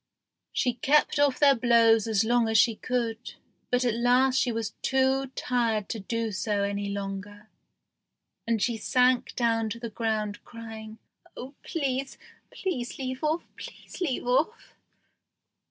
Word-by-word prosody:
She 250 - 0
kept 295 +3 +2
off 285 -3 +3
their 285 -1 +6
blows 230 -3 +4
as 220 -1 +2
long 235 0 +2
as 220 - +3
she 230 +2 +5
could, 235 0 -3 0.3
but 250 0 +1
at 240 - +2
last 250 +3 +3
she 245 - +1
was 225 -1 -3
too 265 0 +2
tired 230 -4 0
to 225 - -3
do 225 +2 -2
so 205 +1 -1
any 200 0 -2
longer, 200 +1 -6 1.0
and 230 -1 +1
she 235 -2 0
sank 250 +3 +2
down 225 -2 +1
to 230 - -6
the 235 -1 -6
ground 215 -2 -2
crying, 220 -2 -9 0.4
"Oh, 260 +3 -8
please 275 -3 -3 0.5
leave 260 -4 -3
off! 310 +3 0
please - - -11
leave 285 -10 -1
off!" 305 - 0
235 Hz, 140 wpm, -27 LUFS, 220-255 Hz, 1.0 s, their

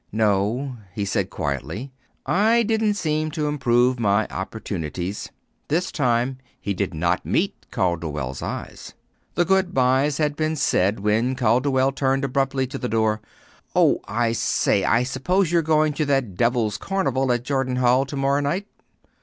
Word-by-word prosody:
"No," 110 +5 0 0.2
he 105 -3 -1
said 95 -1 -1
quietly. 80 - -4 0.3
"I 225 +5 +3
didn't 220 -1 +1
seem 155 -4 -1
to 150 -1 0
improve 125 -3 +2
my 105 -1 +2
opportunities." 95 -2 -4 0.4
This 175 +5 0
time 125 -2 0 0.2
he 100 - -2
did 95 0 -2
not 85 +3 0
meet - - -1
Calderwell's 75 -7 -2
eyes. - - -6 0.4
The 175 - +2
good 190 0 +1
byes 135 +3 +3
had 150 -2 0
been 155 0 -1
said 100 -8 +1
when 110 +5 +1
Calderwell 130 +3 +2
turned 135 0 0
abruptly 135 0 0
at - - -5
the 125 - -2
door. 110 -1 +1 0.5
"Oh, - - +4
I 115 +1 0
say, 115 - +1
I 120 - +3
suppose 165 +8 0
you're 170 -1 +4
going 155 -1 +2
to 155 +1 -1
that 135 -8 0
devil's 115 0 +1
carnival 135 -10 0
at 120 0 0
Jordan 135 -1 -1
Hall 125 +1 +3
to 140 - -6
morrow 140 +1 +2
night." 170 +8 -1
130 Hz, 155 wpm, -23 LUFS, 105-145 Hz, 0.5 s, Oh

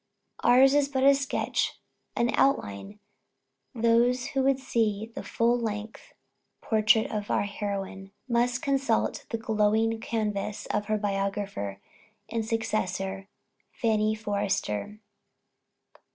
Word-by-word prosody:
Ours 265 +3 +6
is 290 -1 +3
but 265 -2 0
a 280 +1 +8
sketch, 275 0 -1 0.4
an 235 +1 +1
outline; 200 - 0 0.8
those 235 +2 +2
who 270 - 0
would 270 0 +3
see 225 -4 -1
the - - -5
full 235 +1 +1
length 215 -1 -5 0.4
portrait 220 0 +3
of 210 -1 -3
our - - +2
heroine, 195 -1 -5 0.2
must 245 +1 +1
consult 270 -5 0
the 230 - -2
glowing 220 0 +1
canvass 210 -2 -3
of 210 - -1
her 215 0 +1
biographer 195 - -2 0.5
and 230 -1 -1
successor, 195 -4 -2 0.5
"Fanny 215 -1 +1
Forrester." 205 - -2
220 Hz, 110 wpm, -27 LUFS, 205-235 Hz, 0.8 s, a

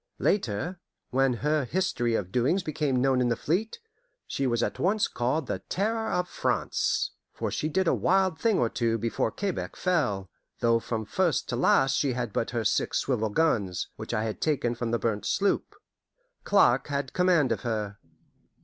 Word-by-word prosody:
Later, 175 - 0 0.3
when 135 +1 +3
her 150 -1 +2
history 120 -5 0
and 95 -4 -2
doings 135 - +1
became 145 -5 0
known 135 -1 +3
in 125 - +2
the 115 - +2
fleet, 190 - -1 0.5
she 135 - -1
was 120 -2 +1
at - - -2
once 205 +3 +2
called 130 +5 -1
the - - -3
Terror 220 +3 0
of 180 0 0
France; - - 0 0.2
for - - -3
she 155 - -1
did 190 +3 +1
a - - +4
wild 190 -2 +2
thing 225 -3 +2
or 120 - +2
two 115 0 0
before 115 0 -1
Quebec 195 - -3
fell, 120 - 0 0.3
though 115 0 +3
from 110 -1 -3
first 175 - 0
to 120 - -1
last 135 +1 +3
she 140 -4 +1
had 120 -4 -3
but 115 - -1
her 115 -2 -2
six - - +1
swivel 110 0 0
guns, 105 - 0
which - - -7
I 110 - 0
had 110 -1 -4
taken 140 -6 +1
from 120 0 -3
the 120 - +1
burnt 110 -3 -2
sloop. 200 0 0 0.7
Clark - - +4
had 140 -2 -3
command 180 -7 +3
of - - -1
her. 105 -4 -3
130 Hz, 180 wpm, -27 LUFS, 115-175 Hz, 0.7 s, a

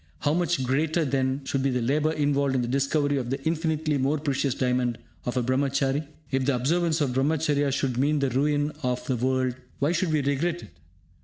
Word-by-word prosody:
How 145 - +2
much 170 -4 +1
greater, 155 +5 +1
then, 135 0 0
should 135 0 -1
be 135 - +1
the 125 -1 0
labour 145 +6 +1
involved 140 -2 +1
in 125 - +1
the - - -2
discovery 140 +2 +1
of 125 -3 -3
the 135 +2 -2
infinitely 160 -2 0
more 140 +4 +1
precious 140 -3 -1
diamond 125 -2 0 0.3
of 125 +1 -2
a 125 - +2
Brahmachary? 140 +3 0 0.2
If 135 -1 +1
the 140 -1 +2
observance 160 +5 +1
of 135 -4 +1
Brahmacharya 145 +1 +1
should 130 -3 -1
mean 150 +3 +2
the 140 -2 0
ruin 145 +3 +1
of 125 -2 -2
the 130 - 0
world, 130 +1 0 0.2
why 145 +3 +1
should 170 -1 0
we 150 -2 +1
regret 160 +5 -1
it? - - -12
140 Hz, 205 wpm, -26 LUFS, 130-150 Hz, 0.3 s, How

